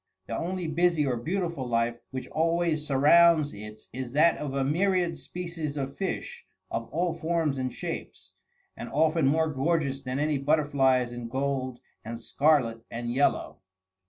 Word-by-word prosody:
The - - -4
only 180 +1 -3
busy 165 -1 +2
or 130 -3 0
beautiful 165 +1 -2
life 115 0 0
which 130 -1 -5
always 165 -1 0
surrounds 150 +2 +5
it 105 +1 -10
is 125 -1 -5
that 165 +3 +5
of 140 -2 -4
a 135 - +1
myriad 175 +4 +1
species 170 -4 -5
of 135 -1 -3
fish, 195 -1 -4 0.3
of 115 0 -3
all 170 +5 0
forms 160 -4 -1
and 130 -1 -2
shapes, - - -7 0.4
and 115 - -7
often 155 0 +2
more 160 +2 +2
gorgeous 140 -1 0
than 130 0 -3
any 150 -1 +1
butterflies 135 -4 +2
in 120 -1 -6
gold 130 -1 -2 0.2
and 115 +1 -6
scarlet 125 -3 +2
and 120 0 -4
yellow. 140 +3 +1
145 Hz, 155 wpm, -28 LUFS, 130-165 Hz, 0.4 s, surrounds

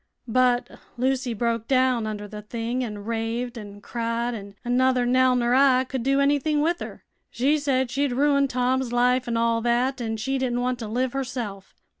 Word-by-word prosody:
But 245 +1 +2 0.3
Lucy 255 -1 0
broke 230 0 -1
down 255 -4 +2
under 210 -1 -5
the 210 +1 -8
thing 235 +4 -3
an' 210 -3 -6
raved 230 +2 -3
an' 205 -2 -9
cried, 235 +1 -2
an' 200 -2 -8
nuther 250 0 +2
Nell 255 +1 +3
ner 240 0 +1
I 260 -1 +5
could 260 -1 -4
do 275 +3 +2
anything 290 +2 +2
with 335 +3 +1
her. - - -8 0.3
She 285 +5 +1
said 265 -3 0
she'd 280 0 0
ruined 280 +1 +2
Tom's 255 0 0
life 250 +1 +2
an' 235 -1 -1
all 230 0 +1
thet, 245 +3 +1
an' 225 -1 -2
she 265 +5 -2
didn't 245 -2 -1
want 250 0 -1
to 225 - -5
live 245 +3 -1
herself. 245 -8 -5
245 Hz, 185 wpm, -24 LUFS, 230-260 Hz, 0.3 s, I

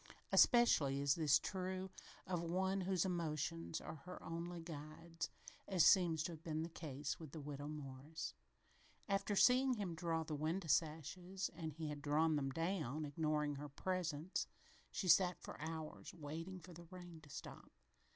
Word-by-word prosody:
Especially 155 - +6
is 140 0 +4
this 155 -3 +5
true 185 -1 -3 0.3
of 180 -2 -1
one 190 +3 +1
whose 185 -1 +1
emotions 165 -2 -1
are - - -7
her 180 +6 -8
only 170 +1 -4
guides, 165 +1 -6 0.4
as 185 -5 +5
seems 170 -5 +6
to 175 - -2
have 160 -2 -8
been 160 -1 -1
the 165 - -4
case 145 -4 -4
with 155 -4 -9
the 160 - -5
Widow 145 0 -5
Morris. 150 +2 -5 0.7
After 200 +1 +1
seeing 255 +4 +6
him 200 -6 -2
draw 165 0 0
the 155 - -5
window 160 +4 -1
sashes 175 +5 0
and 160 -2 -4
he 155 0 -4
had 145 -1 -5
drawn 155 +2 +3
them 140 -2 0
down, 155 -2 -1
ignoring 150 -1 0
her 145 +1 -6
presence 170 +1 -1 0.4
she 190 - -2
sat 180 +1 +6
for - - -8
hours, 160 0 -5
waiting 165 +4 -5
for 180 +1 -11
the 170 0 -11
rain 175 -3 -9
to 150 - -15
stop. - - -8
165 Hz, 160 wpm, -40 LUFS, 150-180 Hz, 0.7 s, Especially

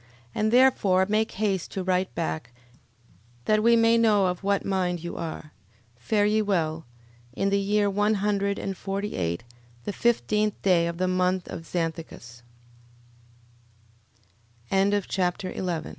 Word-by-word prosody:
And 215 +1 0
therefore 220 -7 +4
make 215 +1 0
haste 195 -3 -1
to 190 - -3
write 185 -6 0
back, 80 +9 -3 0.9
that 215 0 +3
we 235 +1 +5
may 230 0 +4
know 210 -4 +4
of 180 -1 -1
what 200 0 0
mind 180 -3 -1
you 170 - -5
are. 155 -2 -6 0.5
11:38. - - -31
Fare 205 - +1
ye 215 +1 +2
well. 165 -6 -1 0.5
In 195 +8 0
the 200 - +2
year 205 +1 +1
one 205 +2 +1
hundred 200 0 0
and 195 - -4
forty 200 +2 -4
eight, 85 +2 -2 0.4
the 205 - -4
fifteenth 215 -2 +1
day 175 -3 +3
of 170 0 -4
the 185 +1 0
month 185 0 0
195 Hz, 130 wpm, -26 LUFS, 180-210 Hz, 0.9 s, we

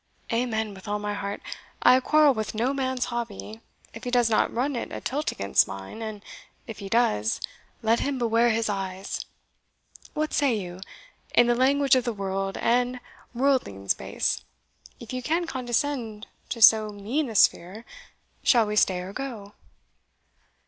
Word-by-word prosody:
Amen 220 -3 -1
with 190 +2 -12
all 205 0 -1
my 210 0 -3
heart 200 0 -5 0.4
I 255 - +7
quarrel 300 +2 +4
with 215 -2 -4
no 240 +5 +1
man's 260 -2 -1
hobby, 225 -1 -5 0.3
if 230 - -10
he 250 - -3
does 245 -2 +3
not 215 - +2
run 260 +4 -1
it 235 - -4
a - - -5
tilt 290 +4 -2
against 100 0 +2
mine, 95 - -8
and 215 -2 -6 0.4
if 225 - -8
he 195 - -7
does 110 - +2 0.4
let 225 +1 +3
him 280 -1 -1
beware 235 0 +3
his 225 0 +1
eyes. 195 -1 -4 0.9
What 305 0 -1
say 275 -5 +2
you? 180 -3 -6 0.5
in 240 - +7
the 240 - +3
language 270 +2 +3
of 255 - +2
the 240 - -1
world 195 -1 -3
and 245 +1 +1 0.4
worldlings 240 - +1
base, - - -2 0.6
if 235 +1 -9
you 255 - -3
can 330 +7 0
condescend 245 -5 -2 0.2
to 230 -2 0
so 215 -1 +7
mean 225 +8 -2
a 225 - -7
sphere, 200 +4 +2 0.6
shall 235 -3 +4
we 210 0 -2
stay 185 -3 +3
or 185 +2 -7
go?" 220 -7 -6
230 Hz, 165 wpm, -26 LUFS, 205-255 Hz, 0.9 s, I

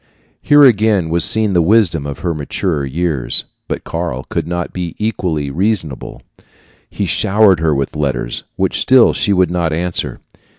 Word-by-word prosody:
Here 145 0 +5
again 105 -8 +3
was 85 -1 +3
seen 110 -3 +3
the 90 - +3
wisdom 85 -6 +2
of 70 - -6
her 85 -2 -1
maturer 75 +1 -3
years; 70 -1 -2 0.2
but - - -4
Karl 80 -7 -4
could 85 -1 -3
not 85 0 -4
be 90 -3 -5
equally 85 -10 -2
reasonable. 85 -4 -3 0.7
He - - -3
showered 100 -3 +3
her 80 -2 +1
with 70 0 -3
letters, 65 -5 -2
which - - -1
still 130 -2 +5
she 105 - 0
would 90 -3 +2
not 85 -2 -1
answer. 85 +2 -3
85 Hz, 160 wpm, -16 LUFS, 75-100 Hz, 0.7 s, Here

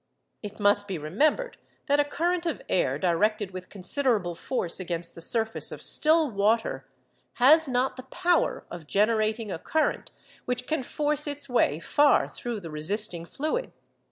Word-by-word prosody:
It 210 +1 -8
must 205 0 +3
be 190 -3 -3
remembered 290 - 0 0.3
that 285 0 +2
a - - +5
current 340 +4 -1
of 330 - -2
air 135 -6 +1
directed 195 +5 0
with 185 -1 -9
considerable 205 -1 0
force 175 -1 -1
against 170 -2 -3
the 170 - -11
surface 225 +4 +1
of - - -8
still 310 -2 +4
water 215 +3 0 0.5
has 310 +5 +5
not 255 0 0
the - - -6
power 350 +1 0
of 170 -3 -9
generating 215 +2 +1
a 165 - -4
current 315 - -1 0.3
which 250 0 -2
can 315 0 -1
force 295 +3 -1
its 290 -1 -4
way 240 - +2
far 290 - +3
through 235 -4 -6
the 165 -3 -8
resisting 170 +3 -2
fluid. 310 - -3
225 Hz, 155 wpm, -26 LUFS, 185-290 Hz, 0.5 s, a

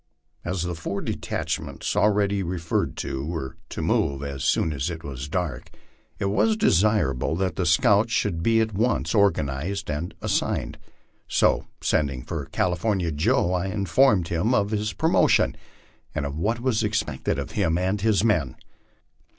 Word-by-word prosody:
As 90 0 -2
the 90 0 -2
four 90 +4 -4
detachments - - -3
already 100 -1 +2
referred 85 -2 -2
to 65 0 -3
were 80 -3 -4
to - - -4
move 70 0 +1
as 70 -2 -5
soon 80 - +2
as 70 +4 -2
it 80 -1 -6
was 70 -2 -6
dark, 80 -7 -3 0.5
it - - -2
was 215 - +2
desirable 85 - +2
that 95 +1 -1
the 90 -3 -1
scouts 105 - +4
should 95 -7 0
be 115 +4 +3
at 110 -1 -1
once 110 +4 0
organized 95 - 0
and 75 +4 -4
assigned. - - -1 0.5
So, - - +2
sending 70 -4 0
for - - -4
California 90 -1 0
Joe, 80 +4 +1
I 90 +1 0
informed 100 -1 +2
him 90 +9 +1
of 100 +1 +1
his 105 0 -1
promotion - - +3 0.6
and 75 -2 -1
what 110 +9 -1
was 120 -3 +1
expected 105 - -1
of - - -4
him 85 0 +1
and 95 +3 0
his 110 -2 +2
men. 85 - +1
90 Hz, 150 wpm, -25 LUFS, 80-105 Hz, 0.6 s, scouts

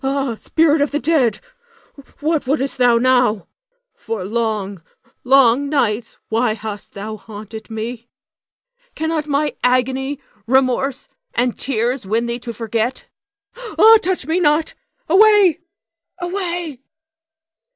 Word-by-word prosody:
Ha! 270 -2 -1
spirit 315 +6 +2
of 285 - +2
the 295 - -2
dead, 280 -9 +1 0.8
what 310 -2 0
wouldst 275 -1 -1
thou 245 -2 +5
now? 245 -6 +2 0.5
For 220 -5 -5
long, 210 -3 -2 0.4
long 270 +1 +4
nights 235 -6 -1
why 225 0 +1
hast 210 -2 -8
thou 215 +2 -6
haunted 215 +1 -10
me? 230 +2 -6 0.9
Cannot 320 -1 -2
my 290 -2 0
agony, 260 +2 +1 0.3
remorse, 265 +1 +1 0.3
and 245 -1 +1
tears 240 -2 -2
win 225 +4 0
thee 235 0 -3
to 240 0 -6
forget? 230 +2 -3 0.7
Ah, 450 +1 +8
touch 365 -5 -1
me 325 +4 0
not! 310 -1 +2 0.3
Away! 395 -2 +5 0.6
away! 350 -6 -4
255 Hz, 115 wpm, -19 LUFS, 225-300 Hz, 0.9 s, Ah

